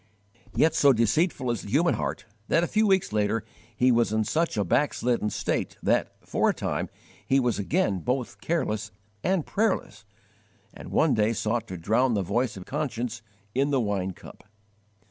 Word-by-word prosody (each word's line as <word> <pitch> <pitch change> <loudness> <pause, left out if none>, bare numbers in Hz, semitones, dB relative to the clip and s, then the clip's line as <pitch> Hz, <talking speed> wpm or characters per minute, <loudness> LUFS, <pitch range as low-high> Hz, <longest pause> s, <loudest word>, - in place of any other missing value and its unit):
Yet 160 0 +4
so 140 -3 +5
deceitful 125 - +1
is 115 - -2
the - - -9
human 160 - +3
heart - - -3 0.2
that 165 - +3
a - - +1
few 215 +4 +2
weeks 190 - +2
later 105 +1 +1 0.3
he 125 +1 +4
was 120 -2 +2
in 110 0 +1
such 165 +3 0
a 105 - +2
backslidden 120 - +1
state - - -2
that, - - +2 0.2
for - - +2
a - - +2
time, - - -2 0.4
he 135 - +4
was 120 -4 0
again 100 - +1
both 125 +7 -3
careless 110 -10 -1 0.3
and 185 -4 +1
prayerless, 195 - -1 0.7
and - - -10
one - - +3
day 110 +1 +2
sought 115 +1 -1
to 95 - -6
drown 115 +8 +2
the 100 - 0
voice 110 +5 -1
of 90 - -9
conscience 125 -6 -3 0.3
in 140 +3 +1
the 140 -2 +2
wine 100 -4 -1
cup. - - -14
120 Hz, 175 wpm, -26 LUFS, 105-145 Hz, 0.7 s, so